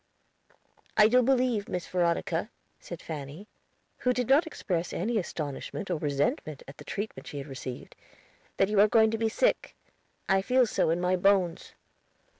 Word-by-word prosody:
"I 210 Hz, -1 st, +8 dB
do 250 Hz, +3 st, +4 dB
believe, 250 Hz, -4 st, +1 dB
Miss 180 Hz, -1 st, -3 dB
Veronica," 170 Hz, +1 st, 0 dB, 0.3 s
said 175 Hz, -2 st, -9 dB
Fanny, 155 Hz, +5 st, -7 dB, 0.5 s
who 250 Hz, -1 st, +2 dB
did 250 Hz, -2 st, -1 dB
not 285 Hz, +6 st, +4 dB
express 175 Hz, -, -3 dB
any 220 Hz, +5 st, 0 dB
astonishment 170 Hz, +3 st, -5 dB
or 170 Hz, -, -1 dB
resentment 145 Hz, 0 st, -1 dB
at 135 Hz, -, -12 dB
the -, -, -9 dB
treatment 210 Hz, +1 st, -5 dB
she 145 Hz, -, -7 dB
had 140 Hz, -, -5 dB
received, 130 Hz, -3 st, -8 dB, 0.6 s
"that 195 Hz, -, +3 dB
you 210 Hz, 0 st, +1 dB
are 210 Hz, -, +7 dB
going 220 Hz, 0 st, +4 dB
to 225 Hz, -, -2 dB
be 225 Hz, -1 st, +1 dB
sick; -, -, 0 dB, 0.5 s
I 195 Hz, 0 st, +3 dB
feel 250 Hz, +4 st, +3 dB
so 210 Hz, -, 0 dB
in 165 Hz, +2 st, +1 dB
my 180 Hz, +1 st, +2 dB
bones." 185 Hz, -2 st, +1 dB
195 Hz, 165 wpm, -28 LUFS, 165-225 Hz, 0.6 s, I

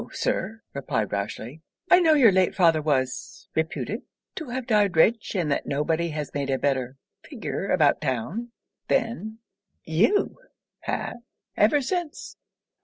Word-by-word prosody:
Sir,' 220 Hz, +3 st, -2 dB
replied 125 Hz, -7 st, -2 dB
Rochely, 110 Hz, +8 st, -4 dB, 0.3 s
'I 360 Hz, -, +9 dB
know 325 Hz, -3 st, +5 dB
your 250 Hz, -8 st, +7 dB
late 185 Hz, -1 st, +2 dB
father 165 Hz, -5 st, +4 dB
was 130 Hz, -4 st, -2 dB
reputed 195 Hz, -, -2 dB, 0.3 s
to 315 Hz, -6 st, -6 dB
have 255 Hz, 0 st, -3 dB
died 210 Hz, -7 st, +2 dB
rich, 220 Hz, +6 st, +3 dB
and 170 Hz, -6 st, 0 dB
that -, -, -1 dB
no 145 Hz, +1 st, 0 dB
body 165 Hz, +2 st, 0 dB
has 150 Hz, -2 st, -5 dB
made 140 Hz, -1 st, -2 dB
a 135 Hz, -, +1 dB
better 130 Hz, -1 st, -1 dB, 0.3 s
figure 235 Hz, -7 st, -5 dB
about 155 Hz, -5 st, +3 dB
town 155 Hz, -, -3 dB, 0.4 s
than 220 Hz, -1 st, -1 dB, 0.5 s
you 210 Hz, -, +2 dB, 0.4 s
have, -, -, -3 dB, 0.4 s
ever 255 Hz, +8 st, +4 dB
since.' 350 Hz, +2 st, -4 dB
170 Hz, 140 wpm, -25 LUFS, 140-230 Hz, 0.5 s, I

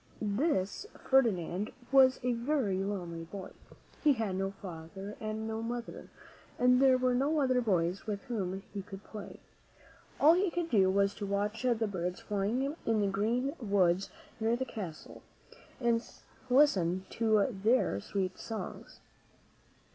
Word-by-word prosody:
This 205 Hz, -, 0 dB
Ferdinand 205 Hz, -7 st, +1 dB, 0.2 s
was 260 Hz, -1 st, +6 dB
a 250 Hz, 0 st, +1 dB
very 235 Hz, -5 st, 0 dB
lonely 175 Hz, -5 st, -4 dB
boy. 190 Hz, +2 st, -8 dB, 0.5 s
He 300 Hz, -2 st, +6 dB
had 220 Hz, -6 st, -2 dB
no 195 Hz, +1 st, -1 dB
father 195 Hz, +1 st, -8 dB
and 215 Hz, 0 st, -4 dB
no 220 Hz, 0 st, -3 dB
mother, 235 Hz, +1 st, -5 dB, 0.5 s
and 250 Hz, +1 st, +4 dB
there 265 Hz, -1 st, +6 dB
were 255 Hz, 0 st, +2 dB
no 285 Hz, +5 st, +2 dB
other 255 Hz, -3 st, +2 dB
boys 185 Hz, -4 st, 0 dB
with 205 Hz, -2 st, -3 dB
whom 195 Hz, -5 st, -3 dB
he 200 Hz, -, -3 dB
could 195 Hz, 0 st, -10 dB
play. 210 Hz, -2 st, -9 dB, 0.8 s
All 310 Hz, +3 st, +7 dB
he 370 Hz, +2 st, +2 dB
could 335 Hz, -1 st, -3 dB
do 195 Hz, -4 st, +5 dB
was 200 Hz, +1 st, +2 dB
to 205 Hz, -, -5 dB
watch 205 Hz, +3 st, -1 dB
the 235 Hz, -3 st, +1 dB
birds 180 Hz, -2 st, -3 dB
flying 230 Hz, +8 st, -1 dB
in 225 Hz, -2 st, +1 dB
the 200 Hz, -, +2 dB
green 235 Hz, +7 st, 0 dB
woods 195 Hz, -3 st, +2 dB, 0.3 s
near 225 Hz, +1 st, +2 dB
the 260 Hz, +2 st, -2 dB
castle, 190 Hz, -10 st, -8 dB, 0.6 s
and 235 Hz, -2 st, +2 dB, 0.5 s
listen 190 Hz, -, +3 dB
to 220 Hz, -3 st, +3 dB, 0.2 s
their 220 Hz, -, +3 dB
sweet 185 Hz, -, -3 dB
songs. 225 Hz, -2 st, -7 dB
215 Hz, 145 wpm, -31 LUFS, 195-250 Hz, 0.8 s, All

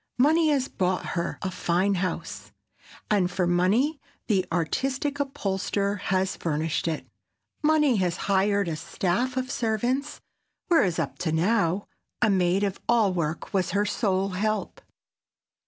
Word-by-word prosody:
Money 310 Hz, +5 st, +4 dB
has 275 Hz, -3 st, +1 dB
bought 185 Hz, 0 st, -1 dB
her 170 Hz, -1 st, -2 dB
fine 185 Hz, +3 st, +1 dB
house, 185 Hz, 0 st, -4 dB, 0.6 s
and 190 Hz, -4 st, +3 dB
for 180 Hz, 0 st, 0 dB
money 200 Hz, -, +2 dB, 0.2 s
the 195 Hz, -4 st, +2 dB
artistic 265 Hz, -, -1 dB
upholsterer 200 Hz, -6 st, -1 dB
has 190 Hz, 0 st, 0 dB
furnished 160 Hz, 0 st, -1 dB
it. 160 Hz, -2 st, -2 dB, 0.6 s
Money 300 Hz, -5 st, +3 dB
has 180 Hz, -3 st, 0 dB
hired 200 Hz, 0 st, +2 dB
a 165 Hz, -, -2 dB
staff 190 Hz, +10 st, -1 dB
of 255 Hz, -1 st, -2 dB
servants, 245 Hz, +5 st, -1 dB, 0.5 s
whereas 195 Hz, -, +3 dB
up -, -, -3 dB
to 160 Hz, -, -1 dB
now, 185 Hz, +2 st, +1 dB, 0.3 s
a 215 Hz, -3 st, +3 dB
maid 185 Hz, +1 st, +2 dB
of 200 Hz, -1 st, -1 dB
all 225 Hz, -5 st, +4 dB
work 165 Hz, -2 st, -3 dB
was 185 Hz, -2 st, +1 dB
her 205 Hz, -, +2 dB
sole 195 Hz, -2 st, 0 dB
"help." 215 Hz, -, -2 dB
195 Hz, 135 wpm, -26 LUFS, 180-245 Hz, 0.6 s, Money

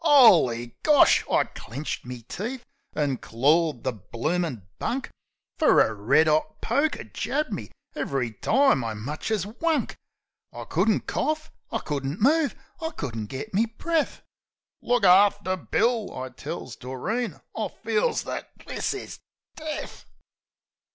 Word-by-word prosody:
'Oly 170 Hz, -, +6 dB
Gosh! 300 Hz, -2 st, +6 dB
I -, -, +4 dB
clinched 135 Hz, +7 st, -6 dB
me 125 Hz, -2 st, -7 dB
teeth, 235 Hz, -, -5 dB, 0.3 s
an' 145 Hz, -3 st, 0 dB
clawed 145 Hz, +4 st, +2 dB
the 130 Hz, -, 0 dB
bloomin' 120 Hz, -, -3 dB
bunk; 265 Hz, +2 st, -2 dB, 0.5 s
Fer 310 Hz, -, +5 dB
a 110 Hz, -, +4 dB
red 135 Hz, +10 st, +3 dB
'ot 155 Hz, 0 st, +1 dB
poker 305 Hz, +3 st, 0 dB
jabbed 300 Hz, -4 st, -2 dB
me 110 Hz, -, -5 dB, 0.3 s
ev'ry 130 Hz, -4 st, -1 dB
time 225 Hz, -, +3 dB
I 110 Hz, -1 st, -3 dB
much 135 Hz, -, -5 dB
as 210 Hz, -5 st, 0 dB
wunk. 305 Hz, +9 st, -1 dB, 0.6 s
I -, -, -7 dB
couldn't -, -, +1 dB
corf, 310 Hz, 0 st, -1 dB, 0.2 s
I 225 Hz, -, 0 dB
couldn't 145 Hz, -4 st, -3 dB
move, 290 Hz, +5 st, +3 dB, 0.3 s
I 320 Hz, -, -1 dB
couldn't 115 Hz, -, -5 dB
git 135 Hz, -, -6 dB
me 220 Hz, +5 st, +3 dB
breath. 315 Hz, +7 st, -1 dB, 0.6 s
"Look 245 Hz, -2 st, +1 dB
after 195 Hz, 0 st, +5 dB
Bill," 225 Hz, +4 st, 0 dB
I 130 Hz, 0 st, -4 dB
tells 125 Hz, -, -7 dB
Doreen. 210 Hz, -, -3 dB, 0.2 s
"I -, -, -1 dB
feels 460 Hz, +2 st, 0 dB
that... -, -, -5 dB, 0.2 s
this -, -, -2 dB
is... 405 Hz, -, -8 dB, 0.4 s
death." 310 Hz, -1 st, -6 dB
180 Hz, 135 wpm, -26 LUFS, -, 0.6 s, Oly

